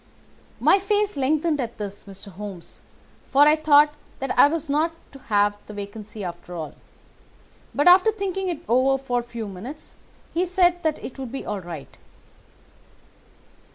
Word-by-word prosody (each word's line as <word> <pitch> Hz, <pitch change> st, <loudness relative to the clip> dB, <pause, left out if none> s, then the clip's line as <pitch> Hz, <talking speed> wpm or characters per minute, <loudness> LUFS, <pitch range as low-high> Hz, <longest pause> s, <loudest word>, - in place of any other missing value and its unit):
"My 395 Hz, -, +5 dB
face 410 Hz, 0 st, 0 dB
lengthened 295 Hz, +2 st, +1 dB
at 235 Hz, -1 st, -5 dB
this, 205 Hz, -1 st, -6 dB
Mr. 195 Hz, 0 st, -10 dB
Holmes, 190 Hz, -2 st, -9 dB, 0.5 s
for 280 Hz, +2 st, +5 dB
I 300 Hz, +1 st, +6 dB
thought 300 Hz, -1 st, +5 dB, 0.2 s
that 270 Hz, -1 st, -3 dB
I -, -, +8 dB
was 320 Hz, +1 st, -3 dB
not 310 Hz, +4 st, +1 dB, 0.2 s
to 275 Hz, -, -12 dB
have 205 Hz, -1 st, +3 dB
the 210 Hz, -, -9 dB
vacancy 205 Hz, +1 st, -7 dB
after 175 Hz, 0 st, -7 dB
all; 160 Hz, -3 st, -5 dB, 1.0 s
but 290 Hz, -, +2 dB
after 370 Hz, +5 st, +7 dB
thinking 385 Hz, -2 st, -3 dB
it 330 Hz, -3 st, -4 dB
over 260 Hz, +3 st, +3 dB
for 250 Hz, -2 st, -1 dB
a -, -, -4 dB
few 235 Hz, -2 st, -6 dB
minutes 220 Hz, +11 st, -9 dB, 0.4 s
he 345 Hz, -, +1 dB
said 355 Hz, -1 st, +2 dB
that 315 Hz, -2 st, 0 dB
it 265 Hz, -, -8 dB
would 260 Hz, -3 st, -6 dB
be 270 Hz, -, -5 dB
all 210 Hz, -1 st, -3 dB
right. 170 Hz, -5 st, -9 dB
270 Hz, 160 wpm, -24 LUFS, 205-325 Hz, 1.0 s, I